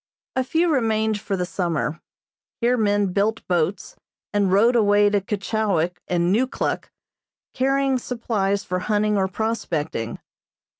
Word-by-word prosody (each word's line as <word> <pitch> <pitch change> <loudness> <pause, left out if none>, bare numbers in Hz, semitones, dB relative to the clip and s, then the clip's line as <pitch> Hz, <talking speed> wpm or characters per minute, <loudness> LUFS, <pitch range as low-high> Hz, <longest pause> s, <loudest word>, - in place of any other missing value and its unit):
A 260 - +2
few 325 +5 +1
remained 220 -4 +1
for 200 -1 -3
the 180 - -1
summer. 170 -3 -2 0.6
Here 245 +1 +3
men 205 -4 +1
built 215 +3 0
boats, 180 +2 -1 0.4
and 200 -2 +2
rowed 225 +6 +4
away 205 -2 +4
to 205 -1 +2
Keechawik 195 -4 -1
and 175 +1 +1
Neukluk, 255 +4 -1 0.6
carrying 270 0 +1
supplies 210 -5 -1
for 180 0 -2
hunting 210 +2 +1
or 190 -1 +2
prospecting. 175 - -3
205 Hz, 130 wpm, -23 LUFS, 185-230 Hz, 0.6 s, rowed